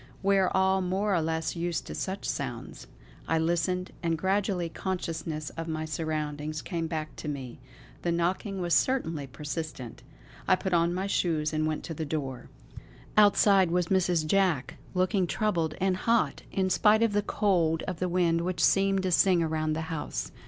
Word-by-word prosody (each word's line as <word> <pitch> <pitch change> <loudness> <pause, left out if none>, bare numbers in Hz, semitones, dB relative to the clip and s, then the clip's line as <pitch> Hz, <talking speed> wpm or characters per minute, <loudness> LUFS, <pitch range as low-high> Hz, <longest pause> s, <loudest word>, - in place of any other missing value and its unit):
We 195 0 +4
are 185 - +3
all 190 0 +3
more 195 +3 0
or 170 - +2
less 160 +1 -2
used 170 0 -2
to - - -7
such 190 +1 -4
sounds. - - -5 0.4
I 165 - +2
listened; 175 +3 0
and 165 -1 0
gradually 190 0 0
consciousness 165 -4 -4
of 165 0 -6
my 160 -1 -3
surroundings 155 -1 -3
came 165 -3 -3
back 155 -1 -4
to - - -6
me. 135 -4 -5 0.4
The 175 - 0
knocking 185 +3 -1
was 175 -1 0
certainly 165 - +1
persistent.... 145 -3 -6 0.5
I 185 - +6
put 185 0 -3
on 170 0 +3
my 185 +2 -2
shoes 160 -6 0
and 155 0 +1
went 155 -1 -2
to 165 - -5
the 160 - -4
door. 140 -4 -4 0.7
Outside 200 -3 +5
was 175 0 0
Mrs. 180 -4 +2
Jack, 180 -5 +1 0.2
looking 185 0 +2
troubled 170 -6 0
and 190 0 +2
hot 230 +3 +1
in 190 -1 0
spite 220 +3 +4
of 225 -2 +2
the 205 - +2
cold 175 -6 +1
of 185 -3 -4
the 180 - 0
wind 170 -2 +2
which 175 -2 -1
seemed 195 0 +3
to 185 - 0
sing 180 -1 +4
around 155 -1 -1
the 160 - -2
house. 160 -1 -4
170 Hz, 175 wpm, -28 LUFS, 160-190 Hz, 0.7 s, I